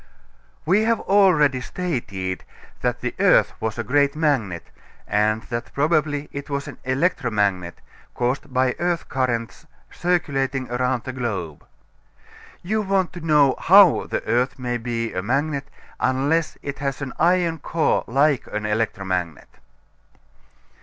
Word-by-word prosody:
We 190 +7 +3
have 230 0 +2
already 160 -10 +4
stated 100 - -4 0.4
that - - -1
the - - -3
earth - - +4
was 110 0 -3
a 115 - -2
great 140 +5 +2
magnet, 130 - -1 0.4
and 110 +1 +1
that 120 -1 -5
probably 150 -1 +1
it 140 +1 -7
was 140 -1 -3
an - - -9
electromagnet, 115 - 0 0.3
caused 130 +4 -2
by 130 0 +2
earth 175 -1 -1
currents 120 -3 -2 0.2
circulating 135 -7 -1
around 125 0 0
the 130 - -5
globe. 100 - -4 1.0
You 215 +5 0
want 195 -3 0
to 175 - -8
know 150 -4 +4
how 190 -2 +6
the - - -3
earth 125 +3 +1
can 120 -2 -3
be 115 -1 -3
a 90 - -2
magnet 140 +5 -1 0.3
unless 140 +5 0
it 140 -1 -5
has 140 0 -3
an 130 - -5
iron 170 -1 +2
core 160 +2 0
like 140 +2 +2
an 105 0 -4
electromagnet. 95 -6 -2
135 Hz, 135 wpm, -22 LUFS, 115-155 Hz, 1.0 s, how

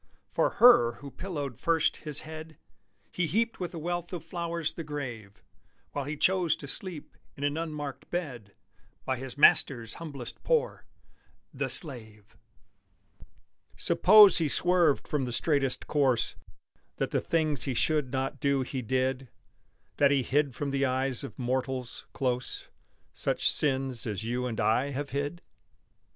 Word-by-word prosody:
For - - +1
her 175 - +7
who 140 +3 -11
pillowed 145 - -6
first 165 -2 +1
his 150 -2 +1
head 160 0 -10 0.5
He 175 -2 -1
heaped 230 +6 -1
with 180 -2 -4
a - - -5
wealth 175 +1 -4
of 170 -3 -5
flowers 170 -2 -3
the 165 - -6
grave, 120 -10 -7 0.5
While 145 -2 -4
he 150 +2 -5
chose 180 -1 +3
to 140 - -10
sleep 170 0 -3 0.2
in 140 - -8
an 145 0 0
unmarked 150 -4 -6
bed, 125 - -5 0.5
By 130 - -1
his 130 +2 -8
Master's 120 -5 +4
humblest 140 -7 -2
poor - - -1 0.7
the - - -3
slave! 110 - +4 1.4
Suppose 205 0 +6
he 160 - +1
swerved 175 -2 +2
from 145 -3 -1
the 125 - -5
straightest 135 +2 -1
course 135 -6 +1 0.6
That - - -3
the - - 0
things 155 -3 0
he 135 -3 -2
should 150 -1 0
not 135 0 -3
do 140 -2 +1
he 130 0 -5
did 130 +2 -1 0.7
That 140 - +4
he 140 -2 +2
hid 140 0 0
from 145 -1 -3
the 140 0 0
eyes 130 -1 -1
of 140 - -9
mortals, 130 0 -3
close, 125 -2 -3 0.4
Such - - -1
sins 135 -4 -1
as 105 0 -4
you 125 +2 -2
and 115 -3 -5
I 125 +6 +1
have 140 +1 -5
hid? 145 +5 -4
140 Hz, 150 wpm, -28 LUFS, 130-160 Hz, 1.4 s, her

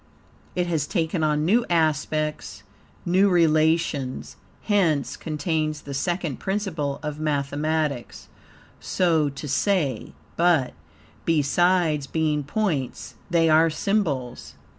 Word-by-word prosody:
It 180 - +1
has 160 -4 -1
taken 165 -2 -1
on 150 0 +1
new 225 +8 +3
aspects, 155 -6 -1 0.4
new 185 +3 +4
relations, 160 -5 +1 0.3
hence 160 - +1
contains 155 -1 -2
the 140 - -8
second 170 0 -2
principle 175 -9 -2
of 150 -1 -4
mathematics, 150 -2 -2 0.5
so 165 -5 +1
to 140 +2 -7
say; 145 - 0 0.2
but, 165 -7 +3 0.5
besides 165 -1 +2
being 150 -1 0
points, 150 - -2 0.2
THEY 170 -2 +3
ARE 160 +1 +5
SYMBOLS. 155 - -2
155 Hz, 100 wpm, -24 LUFS, 145-175 Hz, 0.5 s, ARE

